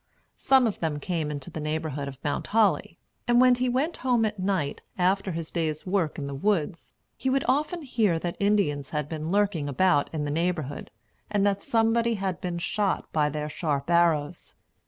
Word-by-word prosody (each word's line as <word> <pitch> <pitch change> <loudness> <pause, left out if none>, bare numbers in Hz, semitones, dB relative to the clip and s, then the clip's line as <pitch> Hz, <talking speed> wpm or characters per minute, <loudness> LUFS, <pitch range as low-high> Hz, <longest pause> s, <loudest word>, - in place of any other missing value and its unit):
Some 265 -2 +4
of 220 - -1
them 155 -3 -1
came 160 -1 -2
into 145 -3 -6
the - - -5
neighborhood 150 -2 -3
of 135 -1 -7
Mount 145 - -2
Holly; 215 -1 +2 0.3
and 240 0 +4
when 255 0 +7
he 250 +1 0
went 275 +7 0
home 245 -3 +2
at 210 -2 -3
night, 185 -7 -1 0.2
after 190 +1 +1
his 165 -1 -5
day's 155 -3 -2
work 185 -5 0
in 145 - -4
the 140 0 -4
woods, 170 +2 -1 0.2
he 265 - -2
would 270 +1 +1
often 305 +5 0
hear 220 - +1
that 170 +1 -3
Indians 195 -10 +1
had 150 -2 -2
been 155 0 -4
lurking 195 -7 +1
about 145 +1 +2
in 150 -2 -2
the 145 - -2
neighborhood, 160 -3 -2 0.4
and 205 -1 +1
that 200 -1 +1
somebody 230 0 +2
had 190 -3 -3
been 175 -2 -3
shot 195 +3 -1
by 150 -2 +2
their 150 +1 -3
sharp 150 0 -2
arrows. 165 -4 +1
175 Hz, 190 wpm, -26 LUFS, 150-210 Hz, 0.4 s, when